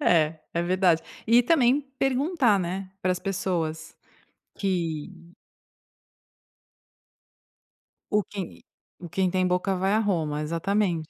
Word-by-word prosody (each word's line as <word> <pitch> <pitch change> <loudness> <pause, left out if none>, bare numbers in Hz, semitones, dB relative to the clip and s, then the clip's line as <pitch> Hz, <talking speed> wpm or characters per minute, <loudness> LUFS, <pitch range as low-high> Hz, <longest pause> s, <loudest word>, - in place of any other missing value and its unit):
É, 160 - +3
é 170 - 0
verdade, 180 -2 +2 0.2
e 235 +2 +6
também 270 -2 +4 0.2
perguntar, 270 - +2
né, 185 +1 -3
para 185 - +1
as 180 - -3
pessoas 170 -5 -3 0.6
que 170 -5 -2 3.0
O 210 -1 +2
quem 195 -4 -7 0.5
quem 190 -1 +1
tem 185 0 +1
boca 180 +2 +1
vai 190 +2 +1
a 220 - +3
Roma, 160 -8 0
exatamente. 170 +1 0
185 Hz, 110 wpm, -26 LUFS, 170-210 Hz, 3.0 s, e